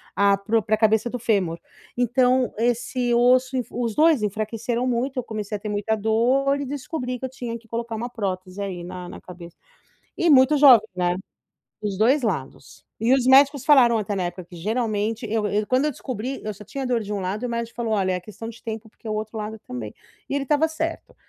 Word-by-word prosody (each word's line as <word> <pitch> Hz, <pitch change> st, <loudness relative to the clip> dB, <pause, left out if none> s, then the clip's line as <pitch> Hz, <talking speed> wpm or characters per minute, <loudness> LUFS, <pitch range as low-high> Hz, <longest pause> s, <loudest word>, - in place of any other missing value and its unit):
a 200 Hz, 0 st, +4 dB
pro 220 Hz, +3 st, +1 dB
pra 215 Hz, -, +2 dB
cabeça 220 Hz, +1 st, +2 dB
do 250 Hz, -, -4 dB
fêmur. 195 Hz, -8 st, 0 dB, 0.4 s
Então, 250 Hz, +1 st, +2 dB
esse 240 Hz, +1 st, 0 dB
osso 255 Hz, +2 st, +4 dB
enf 250 Hz, -2 st, -2 dB
os 230 Hz, -3 st, -2 dB
2 310 Hz, -6 st, +4 dB
enfraqueceram 220 Hz, +4 st, -2 dB
muito, 255 Hz, +2 st, -1 dB
eu -, -, -3 dB
comecei 215 Hz, -2 st, -5 dB
a -, -, -4 dB
ter 210 Hz, -, -5 dB
muita 210 Hz, +1 st, 0 dB
dor 245 Hz, +6 st, +2 dB
e 285 Hz, -, -3 dB
descobri 260 Hz, -2 st, -4 dB
que -, -, -16 dB
eu -, -, -4 dB
tinha 240 Hz, -2 st, -5 dB
que 225 Hz, 0 st, -21 dB
colocar 230 Hz, 0 st, -4 dB
uma 235 Hz, +3 st, -4 dB
prótese 190 Hz, -4 st, -4 dB
aí, 185 Hz, -3 st, -4 dB
na 180 Hz, 0 st, -7 dB
na -, -, -10 dB
cabe 175 Hz, -1 st, -11 dB, 0.7 s
E, 345 Hz, -, +2 dB
muito 270 Hz, +1 st, +6 dB
jovem, 260 Hz, -7 st, +7 dB
né. 175 Hz, -1 st, +1 dB, 0.7 s
Dos 200 Hz, -3 st, -3 dB
2 260 Hz, +7 st, +4 dB
lados. 145 Hz, -, -4 dB, 0.2 s
E 230 Hz, +4 st, +2 dB
os 260 Hz, -2 st, +1 dB
médicos 275 Hz, +1 st, +6 dB
falaram 250 Hz, -6 st, +6 dB
até, 205 Hz, -1 st, -2 dB
na 185 Hz, -, -1 dB
época, 175 Hz, +1 st, -5 dB
que, 175 Hz, -, -13 dB
geralmente, 220 Hz, +3 st, -1 dB
eu 220 Hz, -1 st, 0 dB
eu 210 Hz, +1 st, 0 dB
quando 255 Hz, +4 st, +2 dB
eu 300 Hz, -, +2 dB
descobri, 255 Hz, -1 st, -5 dB
eu 215 Hz, -1 st, -4 dB
só 205 Hz, +2 st, -12 dB
tinha 270 Hz, +5 st, -5 dB
dor 245 Hz, -2 st, +1 dB
de 210 Hz, 0 st, -6 dB
um 205 Hz, -, -2 dB
lado 190 Hz, +4 st, -3 dB
e, -, -, +1 dB
o -, -, -5 dB
médico 235 Hz, 0 st, -4 dB
falou: 230 Hz, -2 st, -2 dB
"Olha, 190 Hz, -3 st, +1 dB
é 180 Hz, -, -2 dB
questão 215 Hz, +4 st, -9 dB
de 230 Hz, 0 st, -11 dB
tempo, 220 Hz, 0 st, -6 dB
porque 220 Hz, -, -18 dB
o -, -, -1 dB
outro 215 Hz, +1 st, -4 dB
lado 215 Hz, +1 st, -5 dB
também." 115 Hz, -4 st, -6 dB, 0.4 s
E -, -, -3 dB
ele 280 Hz, -1 st, 0 dB
estava 295 Hz, +3 st, +2 dB
certo. 325 Hz, +1 st, -4 dB
225 Hz, 225 wpm, -23 LUFS, 205-255 Hz, 0.7 s, jovem